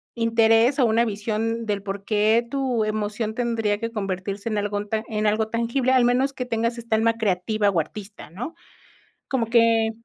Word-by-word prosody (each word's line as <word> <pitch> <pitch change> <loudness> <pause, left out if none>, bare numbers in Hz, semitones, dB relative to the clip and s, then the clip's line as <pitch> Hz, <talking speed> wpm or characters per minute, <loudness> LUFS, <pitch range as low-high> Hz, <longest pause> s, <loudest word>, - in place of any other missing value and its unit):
interés 230 +2 +3
o 255 - +5
una 230 +2 +3
visión 220 +2 -2
del 205 -2 -2
porqué, 210 +3 +1
tu 260 -4 0
emoción 215 +1 -2
tendría 230 -4 0
que 230 +1 -3
convertirse 200 0 -4
en 215 - -1
algo 205 0 -2
tan 220 +1 -2
en 215 -1 -2
algo 215 +1 +1
tangible, 235 +3 0
al 255 -2 +5
menos 255 +3 +2
que 250 -2 -4
tengas 230 0 -1
esta 230 -1 -1
alma 230 +1 +3
creativa 210 0 0
o 185 -4 +1
artista, 200 +6 -7
¿no?, 245 - -6 0.7
como 245 -4 -1
que, 230 -1 +3
225 Hz, 175 wpm, -23 LUFS, 210-235 Hz, 0.7 s, o